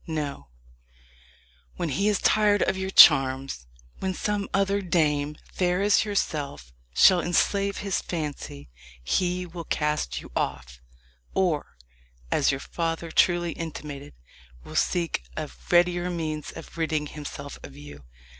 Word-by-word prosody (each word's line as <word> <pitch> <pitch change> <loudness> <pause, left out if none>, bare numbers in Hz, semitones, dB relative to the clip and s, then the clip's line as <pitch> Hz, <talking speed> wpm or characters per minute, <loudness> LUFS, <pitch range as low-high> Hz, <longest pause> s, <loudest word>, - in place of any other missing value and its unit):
No; 150 - -4 1.3
when 170 - -2
he 175 +9 0
is 210 -2 +3
tired 210 -1 +3
of 190 - 0
your 190 0 -3
charms 135 - +6 0.3
when 190 -1 -2
some 205 -1 -2
other 195 +1 +1
dame, 150 -4 +1 0.2
fair 180 +1 +1
as 205 +1 +4
yourself, 145 - -3 0.2
shall 180 - +6
enslave 200 +3 +1
his 195 -1 -1
fancy, 145 - -6 0.3
he 180 - 0
will 170 -1 -8
cast 150 - -1
you - - -12
off, - - -3 0.5
or, 170 - 0 0.5
as - - +3
your 135 - 0
father 165 +1 -3
truly 175 -1 +3
intimated, 150 - -7 0.5
will - - -10
seek 170 - 0 0.2
a - - -2 0.2
readier 175 0 +3
means 155 -4 -3
of - - -11
ridding 155 -2 0
himself 145 -1 -8
of 140 - -11
you. 145 - -11
165 Hz, 130 wpm, -26 LUFS, 145-185 Hz, 1.3 s, charms